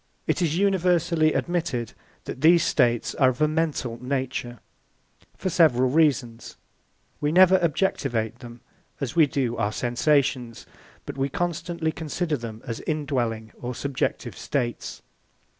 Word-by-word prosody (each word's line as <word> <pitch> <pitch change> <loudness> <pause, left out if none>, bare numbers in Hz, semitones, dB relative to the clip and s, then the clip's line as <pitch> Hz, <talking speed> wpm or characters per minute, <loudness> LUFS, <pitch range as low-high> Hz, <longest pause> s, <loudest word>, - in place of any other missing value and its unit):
It - - 0
is 165 -1 +1
universally 175 -4 +2
admitted 160 -10 -2 0.3
that 130 - -7
these 170 +1 +6
states 120 -1 +1
are 130 -2 +4
of 125 - -4
a 155 - +4
mental 150 -7 -2
nature, 130 -2 -3 0.8
for 185 - -2
several 130 -7 +4
reasons. 135 -7 +1 0.6
(1) 145 - -1
We - - +1
never 185 +2 +6
objectivate 120 - 0
them 120 -1 -11 0.4
as 140 +1 -4
we 160 -3 +6
do 125 -4 -1
our 105 -2 0
sensations, 125 0 0 0.4
but - - -7
we 135 +1 0
constantly 170 +1 -2
consider 160 0 -2
them 115 -4 -8
as 115 -1 -4
indwelling 125 -8 -2
or 125 0 -4
subjective 140 +1 -3
states. 120 -4 -3
140 Hz, 135 wpm, -25 LUFS, 120-165 Hz, 0.8 s, these